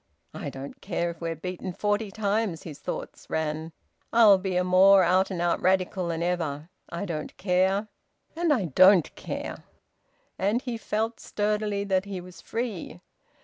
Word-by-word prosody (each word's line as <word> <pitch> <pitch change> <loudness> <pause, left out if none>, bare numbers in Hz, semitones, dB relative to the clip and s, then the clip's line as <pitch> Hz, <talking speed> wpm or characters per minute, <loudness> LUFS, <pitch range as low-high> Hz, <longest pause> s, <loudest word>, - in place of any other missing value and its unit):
"I - - -5
don't 135 +1 -9
care 170 -3 -1
if 170 - -14
we're 165 -1 -2
beaten 180 +2 -5
forty 205 +3 0
times," 205 -4 -1
his 155 -4 -9
thoughts - - -6
ran. 160 +1 -2 0.4
"I'll 215 -4 +7
be 185 -1 -2
a 180 - +2
more 190 +1 +6
out 185 +2 +3
and 185 -3 -4
out 175 0 +1
Radical 185 -1 +1
than 165 0 -2
ever! 165 -3 -2 0.2
I 170 +4 -4
don't 155 -5 -5
care, 190 +2 +1 0.5
and 335 -1 +1
I 235 -10 +2
don't 185 +3 +5
care!" - - -6 0.8
And 210 +6 +1
he 245 -3 -3
felt 220 +2 -2
sturdily 210 -1 -1
that 190 -1 +1
he 195 -2 -5
was 180 -1 -12
free. 225 - -4
185 Hz, 160 wpm, -27 LUFS, 170-205 Hz, 0.8 s, I'll